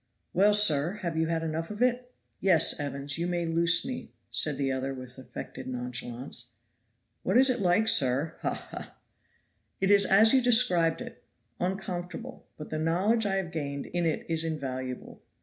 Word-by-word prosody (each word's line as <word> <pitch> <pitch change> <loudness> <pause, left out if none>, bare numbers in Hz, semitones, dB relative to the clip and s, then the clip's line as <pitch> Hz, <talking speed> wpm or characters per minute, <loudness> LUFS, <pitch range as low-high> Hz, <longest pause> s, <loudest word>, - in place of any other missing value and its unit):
"Well, 205 +3 +4
sir, 165 -5 +4
have 170 -2 -2
you 160 0 +1
had 165 0 -1
enough 165 +1 -3
of 210 0 -7
it?" 250 0 0 0.3
"Yes, 175 -6 +3
Evans; 140 +1 -2
you 170 - -1
may 175 -1 -1
loose 165 +1 +3
me," 255 -2 -6 0.2
said 150 -3 +1
the 135 -1 0
other 135 +1 -3
with 130 0 -10
affected 130 - -8
nonchalance. 125 -1 -4 0.7
"What - - +1
is 260 +1 +6
it 250 - -2
like, 190 +4 +2
sir? 135 - +2
haw! - - -2
haw!" - - -10 0.8
"It 195 +1 +2
is 200 -1 +5
as 215 +4 +6
you 265 - +5
described 185 -10 +3
it, 125 - -9 0.4
_on_comfortable; 190 +5 -5
but 150 - -9
the 155 - -2
knowledge 195 +8 +1
I 195 - 0
have 190 -3 -2
gained 140 -3 -4
in 175 -1 -1
it 160 - -2
is 165 -1 0
invaluable. 130 -5 -5
165 Hz, 170 wpm, -28 LUFS, 140-195 Hz, 0.8 s, is